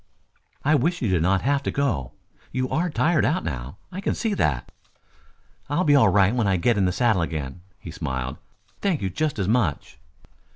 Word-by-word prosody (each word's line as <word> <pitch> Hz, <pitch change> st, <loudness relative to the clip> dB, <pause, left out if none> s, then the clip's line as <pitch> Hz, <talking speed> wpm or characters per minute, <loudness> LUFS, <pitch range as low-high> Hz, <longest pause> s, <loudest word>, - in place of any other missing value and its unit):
"I 150 Hz, -, +4 dB
wish 165 Hz, +3 st, +1 dB
you 110 Hz, -, +1 dB
did 90 Hz, -3 st, +2 dB
not 95 Hz, +3 st, +2 dB
have 140 Hz, +1 st, +2 dB
to -, -, -2 dB
go. 80 Hz, -, -1 dB, 0.4 s
You 130 Hz, 0 st, -1 dB
are 175 Hz, +3 st, 0 dB
tired 160 Hz, +1 st, +2 dB
out 175 Hz, +5 st, +1 dB
now. 65 Hz, +4 st, -5 dB
I 190 Hz, +2 st, -5 dB
can -, -, -1 dB
see 225 Hz, -3 st, -1 dB
that." 70 Hz, -, -1 dB, 1.0 s
"I'll 145 Hz, +5 st, +1 dB
be 145 Hz, -, +4 dB
all 140 Hz, -, +6 dB
right 100 Hz, +1 st, +4 dB
when 120 Hz, -4 st, +1 dB
I 95 Hz, -1 st, +2 dB
get 120 Hz, +7 st, +2 dB
in 100 Hz, -2 st, +2 dB
the 90 Hz, -, +2 dB
saddle 110 Hz, -2 st, +2 dB
again," 80 Hz, -1 st, -4 dB, 0.2 s
he -, -, -9 dB
smiled. 65 Hz, 0 st, -4 dB, 0.4 s
"Thank 185 Hz, -, 0 dB
you 95 Hz, -, -1 dB
just 150 Hz, -, -1 dB
as 95 Hz, -3 st, -1 dB
much." 105 Hz, -, 0 dB
115 Hz, 200 wpm, -24 LUFS, -, 1.0 s, all